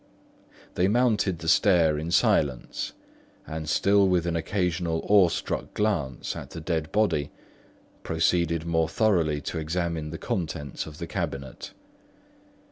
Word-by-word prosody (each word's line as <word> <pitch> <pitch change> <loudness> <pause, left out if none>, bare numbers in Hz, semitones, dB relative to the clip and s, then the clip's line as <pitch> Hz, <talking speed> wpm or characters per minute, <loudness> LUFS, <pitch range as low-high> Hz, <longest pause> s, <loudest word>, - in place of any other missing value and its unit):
They 90 +2 +2
mounted 105 -5 +2
the 85 -1 -8
stair 85 -4 +4
in 80 +2 -4
silence, 70 -6 +1 0.5
and 80 -1 -5
still 100 +4 +4
with 90 -2 +2
an 85 -1 -1
occasional 85 -1 -1
awestruck 90 -11 +2
glance 85 - -1
at - - -7
the - - -7
dead 80 -1 -2
body, 100 -10 +1 0.7
proceeded 85 0 +1
more 80 -1 +1
thoroughly 85 -9 +1
to 80 - -4
examine 80 -1 -2
the 80 - -6
contents 80 -7 -4
of 75 -1 -10
the - - -5
cabinet. 70 -1 -5
85 Hz, 125 wpm, -26 LUFS, 80-90 Hz, 0.7 s, stair